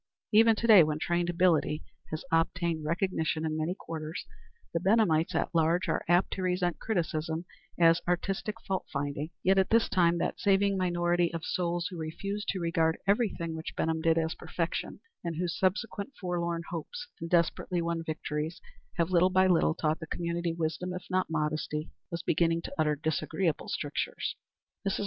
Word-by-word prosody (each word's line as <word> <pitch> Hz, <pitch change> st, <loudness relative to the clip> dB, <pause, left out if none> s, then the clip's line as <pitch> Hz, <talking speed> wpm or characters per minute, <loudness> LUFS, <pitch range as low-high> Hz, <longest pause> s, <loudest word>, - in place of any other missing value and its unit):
Even 225 Hz, +1 st, +6 dB
to 230 Hz, -, -3 dB
day, 215 Hz, -5 st, +9 dB
when 150 Hz, 0 st, -1 dB
trained 175 Hz, +2 st, 0 dB
ability 170 Hz, -3 st, +2 dB, 0.3 s
has 155 Hz, +2 st, -5 dB
obtained 165 Hz, 0 st, +1 dB
recognition 160 Hz, -1 st, 0 dB
in 155 Hz, -1 st, -1 dB
many 160 Hz, +3 st, -1 dB
quarters, 160 Hz, -3 st, -6 dB, 0.5 s
the 170 Hz, -, +1 dB
Benhamites 180 Hz, -4 st, +3 dB
at -, -, 0 dB
large 170 Hz, +3 st, +2 dB
are -, -, 0 dB
apt 175 Hz, +2 st, +4 dB
to 190 Hz, -, -4 dB
resent 180 Hz, -1 st, 0 dB
criticism 165 Hz, -4 st, -2 dB, 0.3 s
as 165 Hz, 0 st, +5 dB
aristocratic 195 Hz, +5 st, -1 dB
fault 190 Hz, -1 st, -3 dB
finding; 145 Hz, +1 st, -2 dB
yet 190 Hz, +1 st, +4 dB
at 190 Hz, -, +2 dB
this 230 Hz, 0 st, +4 dB
time 175 Hz, -2 st, +3 dB
that -, -, -2 dB
saving 200 Hz, 0 st, +3 dB
minority 175 Hz, -1 st, +1 dB
of 165 Hz, -1 st, -5 dB
souls 175 Hz, -1 st, -1 dB
who 180 Hz, -, -6 dB
refused 195 Hz, +6 st, -4 dB
to 190 Hz, -, -1 dB
regard 165 Hz, -1 st, +1 dB
everything 200 Hz, -5 st, +1 dB
which 160 Hz, 0 st, -6 dB
Benham 160 Hz, 0 st, 0 dB
did 165 Hz, 0 st, +3 dB
as 160 Hz, 0 st, +1 dB
perfection, 165 Hz, -1 st, -4 dB, 0.2 s
and 170 Hz, -2 st, -3 dB
whose 175 Hz, +1 st, -2 dB
subsequent 200 Hz, +5 st, -1 dB
forlorn 170 Hz, -2 st, -2 dB
hopes 485 Hz, -, -5 dB
and 165 Hz, -, -5 dB
desperately 175 Hz, +1 st, +1 dB
won 170 Hz, 0 st, -1 dB
victories 155 Hz, 0 st, -3 dB, 0.4 s
have 170 Hz, +1 st, +1 dB
little 180 Hz, +1 st, +5 dB
by 185 Hz, 0 st, +4 dB
little 170 Hz, -3 st, +3 dB
taught 155 Hz, -1 st, 0 dB
the 160 Hz, -, -7 dB
community 170 Hz, +1 st, -2 dB
wisdom, 165 Hz, +2 st, -2 dB
if 180 Hz, -, -7 dB
not 185 Hz, -1 st, +1 dB
modesty, 155 Hz, 0 st, -2 dB, 0.2 s
was 170 Hz, -2 st, -4 dB
beginning 165 Hz, +1 st, +2 dB
to -, -, -6 dB
utter 155 Hz, -2 st, +2 dB
disagreeable 160 Hz, +3 st, -1 dB
strictures. -, -, -2 dB, 0.5 s
Mrs. 195 Hz, -2 st, -1 dB
170 Hz, 170 wpm, -30 LUFS, 160-185 Hz, 0.5 s, day